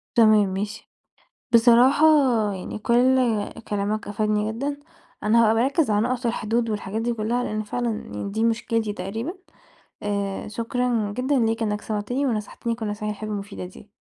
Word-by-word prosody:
تمام، 215 -3 +5
ماشي. 205 +3 -5 0.7
بصراحة 245 +5 +6 0.5
يعني 185 +2 -6
كلّ 245 +4 +3 0.5
كلامك 205 +1 -2
أفادني 210 +1 0
جدًا، 280 +5 -3 0.4
أنا 215 +2 +3
هابقى 220 0 +4
باركّز 270 +4 +2
على 205 - +3
النُقط 250 0 -2
والحدود 230 0 0
والحاجات 210 +1 -3
دي 240 +1 0
كلّها 230 +3 -1
لأن 215 0 -2
فعلًا 240 +3 -2
يعني 150 - -5
دي 220 +3 -1
مشكلتي 230 -1 0
تقريبًا، 220 - -4 0.7
آآ، 200 -1 -2
شكرًا 230 0 -1
جدًا 260 +2 +1
ليك 225 0 +1
إنك 210 -1 -1
سمَعتني 220 +6 -2
ونصَحتني 230 0 -2
كلّ 225 -1 -5
النصايح 210 0 -3
الحلوة 215 0 -5
المفيدة 200 -2 -6
دي. 195 +3 -14
220 Hz, 150 wpm, -24 LUFS, 210-240 Hz, 0.7 s, بصراحة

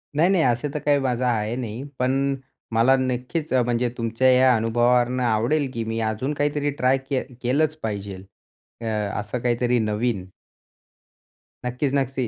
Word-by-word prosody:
नाही, 165 +5 +4
नाही, 180 -5 +3
असं 125 +4 +1
तर 150 - -2
काही 145 0 +2
माझं 125 -2 0
आहे 115 -1 0
नाही. 120 0 -5 0.2
पण 135 +2 +1 0.4
मला 120 +4 +5
नक्कीच 130 +4 -2
अ, 130 - +4
म्हणजे 120 0 0
तुमच्या 115 +3 +2
या 130 -1 +5
अनुभवावरून 120 +2 +2
आवडेल, 125 +5 +1
की 115 -1 -2
मी 115 0 -2
अजून 110 +6 -1
काहीतरी 145 0 0
ट्राय 135 -1 +2
केलं 135 -1 -4
केलंच 145 +5 +1
पाहिजेल. 100 -3 -5 0.6
अ, - - -5 0.3
असं 105 +4 -4
काहीतरी 120 0 +1
नवीन. 105 -2 -1 1.4
नक्कीच, 125 +3 -1
नक्की. 135 -2 -1
125 Hz, 150 wpm, -23 LUFS, 115-135 Hz, 1.4 s, मला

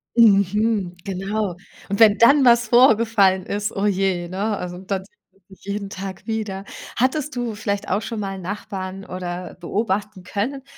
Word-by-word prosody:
Mhm, 205 -3 +3
genau. 195 0 -2 0.3
Und 200 - -2
wenn 215 -2 +7
dann 275 +4 +6
was 235 -1 +5
vorgefallen 225 -6 +4
ist, 205 +1 -2
oje, 195 -3 0
ne, 205 +3 -1
also 180 0 -6
dann 190 0 -3
sieht - - -28 0.2
man 195 - -31
sich 190 - -17
jeden 200 0 -4
Tag 190 -1 -7
wieder. 210 -3 -3 0.3
Hattest 265 +4 0
du 240 -2 -2
vielleicht 205 -1 -3
auch 200 +4 +1
schonmal 195 -4 -4
Nachbarn 195 0 -6
oder 180 -1 -6
beobachten 200 0 -2
können, 255 +9 -3
200 Hz, 150 wpm, -22 LUFS, 190-220 Hz, 0.3 s, wenn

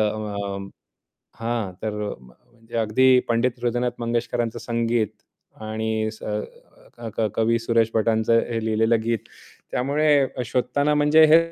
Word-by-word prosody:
अ, 105 -2 -2 0.8
हां, 115 -4 -2
तर 110 - -1 0.3
म्हणजे 115 - -13
अगदी 125 +4 +4
पंडित 120 +1 +1
हृदयनाथ 120 +1 0
मंगेशकरांचं 120 0 -1
संगीत 115 -1 0 0.5
आणि 110 0 -2
स 110 - -15 0.7
क 120 - -14
क 110 - +2
कवी 115 +1 +2
सुरेश 115 -1 +1
भटांचं 110 +1 +3
हे 115 -1 -2
लिहिलेलं 110 +1 +2
गीत, 115 -1 +1 0.5
त्यामुळे 145 +5 +1 0.3
अ, 125 - -1
शोधताना 145 +5 +1
म्हणजे 150 +2 +5
हे 165 - +10
115 Hz, 125 wpm, -23 LUFS, 110-120 Hz, 0.8 s, हे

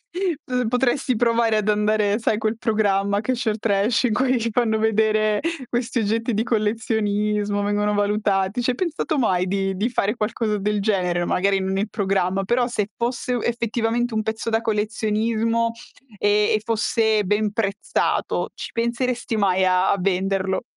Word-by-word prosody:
P 315 - -3
potresti 255 +1 +1
provare 230 -1 +2
ad 215 0 -1
andare, 210 0 +2
sai, 220 -2 0
quel 220 0 -1
programma, 200 -2 +1
Cash 245 +2 -2
or 215 0 0
Trash 205 +1 +1
in 230 - +2
cui 255 +2 +2
fanno 220 -1 +1
vedere 215 -1 +2 0.3
questi 240 0 -2
oggetti 225 +3 0
di 215 - +1
collezionismo, 210 -2 0
vengono 205 0 0
valutati. 205 +1 0
Ci 255 - +1
hai 245 - -2
pensato 325 -3 -2
mai 185 -7 +1
di 195 0 -1
di 210 +5 0
fare 210 -3 0
qualcosa 215 -1 -1
del 210 +1 -1
genere? 180 -4 0
Magari, 195 +2 +1
non 190 0 -1
il 205 - -1
programma, 195 -1 0
però, 240 +4 +1
se 215 -4 -2
fosse 245 +1 -2
u 240 - -1
effettivamente 235 0 -1
un 215 - 0
pezzo 220 +1 -3
da 225 0 +2
collezionismo 225 +1 0 0.5
e 205 - +1 0.3
e 215 - +1
fosse 220 -1 +1
ben 210 +2 0
prezzato, 205 -2 -1
ci - - -7
penseresti 235 0 -1
mai 190 -2 +2
a 185 0 +3
a - - +2
venderlo? 190 +1 0
215 Hz, 160 wpm, -22 LUFS, 205-235 Hz, 0.5 s, a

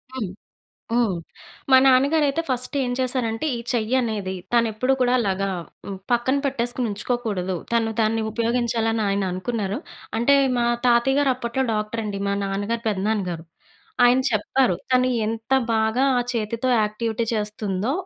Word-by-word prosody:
హ్మ్. 220 -8 -3 0.6
హ్మ్. 230 -5 +2 0.6
మా 260 - +9
నాన్నగారయితే 280 +3 +3
ఫస్ట్ 255 +1 -2
ఏం 245 - -2
చేశారంటే 250 -2 -1
ఈ - - -4
చెయ్యనేది 220 -4 0 0.2
తనెప్పుడు 235 +2 +2
కూడా 250 0 +3
అలాగా 195 -3 0 0.4
హ్మ్, 195 -1 -5
పక్కన 240 +3 +2
పెట్టేసుకొని 245 -2 -1
ఉంచుకోకూడదు. 205 -4 -2 0.2
తన్ను 230 -1 +1
తాన్ని 225 0 +2
ఉపయోగించాలని 230 -1 0
ఆయన 200 0 0
అనుకున్నారు. 200 +2 -2 0.4
అంటే 240 +5 +4 0.2
మా 240 - +2 0.2
తాతయ్య 245 +3 +4
గారు 280 -2 +3
అప్పట్లో 250 +1 -2
డాక్టర్ 215 +2 -2
అండి. 205 -2 -4
మా 200 - +1
నాన్నగారి, 205 +4 -2
పెద్దనాన్న 205 +1 0
గారు. 165 -2 -5 0.6
ఆయన 245 +1 +5
చెప్పారు. 215 +1 +2 0.2
తను 255 0 +4 0.2
ఎంత 225 +3 -5 0.2
బాగా 220 +3 +2
ఆ - - +3
చేతితో 230 +2 -1
యాక్టివిటీ 220 +2 -1
చేస్తుందో, 210 0 -2
230 Hz, 135 wpm, -23 LUFS, 210-250 Hz, 0.6 s, మా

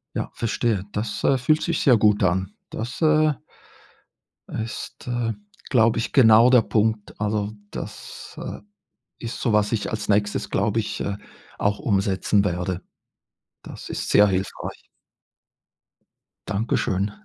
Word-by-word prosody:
Ja, - - -2
verstehe. 115 -3 -1
Das, 105 +1 -3
äh, 135 - +4
fühlt 155 +5 +2
sich 170 -2 0
sehr 125 -4 +5
gut 105 -1 +3
an. 95 +1 +1 0.2
Das, 120 +3 -5
äh 155 -1 +4 1.2
ist, 110 0 -6
äh, 120 -2 -1 0.4
glaube 115 -3 +4
ich, 115 - -2
genau 115 -1 +7
der 125 -3 +6
Punkt. 110 -1 -1
Also, 105 0 -1 0.2
das, - - -8
äh, - - -6 0.6
ist 115 - -6
so, 115 - +1
was 105 -1 +2
ich 110 -3 -1
als 105 -1 -4
Nächstes, 105 0 +1
glaube 105 +3 +1
ich, 105 - -3
äh, 100 0 -2 0.4
auch 100 0 0
umsetzen 100 -4 +1
werde. 90 -1 -2 0.8
Das - - -9
ist - - -4
sehr 105 - +6
hilfreich. 95 0 -4 1.6
Dankeschön. 100 -2 0
105 Hz, 130 wpm, -23 LUFS, 100-115 Hz, 1.6 s, genau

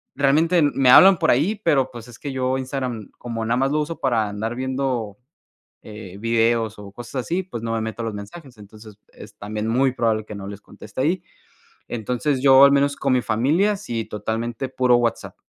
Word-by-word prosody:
realmente 155 +5 +3
me 135 -3 +2
hablan 190 +7 +8
por - - +1
ahí, 155 - +2
pero 135 -5 +2
pues 120 -1 -10
es 120 - -13
que 140 - -6
yo 130 0 -1
Instagram 130 -5 -5
como 115 -2 -4
nada 120 +2 0
más 135 +2 +1
lo 150 0 +1
uso 160 +2 -5
para 115 -5 +1
andar 110 +3 -4
viendo, 130 -5 -3 0.7
eh 105 -3 -10
videos 115 -1 0
o 100 -1 -11
cosas 120 +4 -10
así, 180 +3 -1
pues, 120 -11 -8
no 115 - -3
me 115 - -1
meto 110 +1 -5
a - - -3
los 110 - -4
mensajes. 120 +6 -10
Entonces, 105 0 -14 0.2
es - - -13
también 105 +1 -5
muy 130 +2 +2
probable 115 -3 0
que 105 - -9
no 100 -1 -8
les 100 0 -8
conteste 105 +4 -10
ahí. 170 +6 0 0.7
Entonces, 125 +4 -2
yo, 135 0 +7
al 140 - +7
menos 140 0 +2
con 135 -2 0
mi 125 - +2
familia, 155 - +1
sí, 120 - -5
totalmente 115 +4 -4
puro 125 -2 +3
WhatsApp. 120 -1 -2
120 Hz, 200 wpm, -22 LUFS, 110-135 Hz, 0.7 s, hablan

